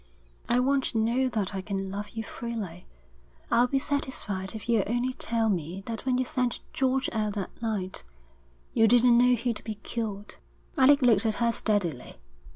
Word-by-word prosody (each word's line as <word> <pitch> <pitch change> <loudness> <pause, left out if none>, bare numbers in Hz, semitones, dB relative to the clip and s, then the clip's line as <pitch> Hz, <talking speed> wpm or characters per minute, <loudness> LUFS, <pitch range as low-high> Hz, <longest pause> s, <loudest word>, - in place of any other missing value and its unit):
I 240 - +3
want 270 +1 +2
to 230 - -2
know 240 +4 +2
that 210 -5 -2
I 190 - -3
can 195 0 -4
love 205 +1 -5
you 225 - -5
freely. 215 -8 -6 0.6
I'll 240 +1 +5
be 275 - 0
satisfied 255 -9 -2
if 220 - -8
you'll 230 -3 +3
only 245 +3 0
tell 230 -2 0
me 180 -1 -2
that 230 +2 -6
when 250 -1 +2
you 255 - +1
sent 250 -1 -1
George 265 0 +1
out 215 -2 -1
that 200 +1 -6
night, 205 -5 -3 0.7
you 225 - +5
didn't 240 +1 +6
know 250 +1 +5
he'd 235 -1 -2
be 220 -1 -4
killed.' 210 -3 -5 0.4
Alec 280 -1 +5
looked 225 -3 +4
at 215 - +1
her 235 -1 +2
steadily. 190 - -1
230 Hz, 175 wpm, -28 LUFS, 205-250 Hz, 0.7 s, didn't